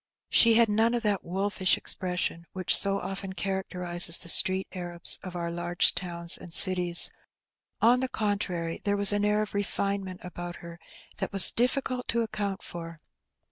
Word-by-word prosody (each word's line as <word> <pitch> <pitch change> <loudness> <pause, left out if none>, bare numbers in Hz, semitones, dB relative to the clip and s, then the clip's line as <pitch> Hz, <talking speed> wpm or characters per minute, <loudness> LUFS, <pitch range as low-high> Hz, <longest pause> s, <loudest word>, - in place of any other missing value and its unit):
She 230 -1 +5
had 230 0 +4
none 225 +3 0
of 235 - -4
that 205 -3 -1
wolfish 190 +1 -1
expression 180 -2 -3
which 185 -1 +3
so 200 0 +3
often 195 0 -7
characterizes 180 -2 0
the 170 - -7
street 190 +2 +6
Arabs 175 -2 0
of 185 -1 -10
our 170 -1 -5
large 175 +1 +1
towns 170 -2 0
and 175 - -12
cities; 180 -2 +5 0.7
on 240 +3 +3
the 260 0 -3
contrary, 200 -7 -4
there 205 0 -1
was 200 0 +5
an 205 0 -1
air 210 +1 0
of 210 - -10
refinement 200 -2 -4
about 175 -1 -8
her 170 0 -13 0.4
that - - -5
was 195 -1 +5
difficult 250 +1 -2
to 235 0 -1
account 205 -3 -5
for. 165 -1 -9
190 Hz, 165 wpm, -26 LUFS, 175-205 Hz, 0.7 s, street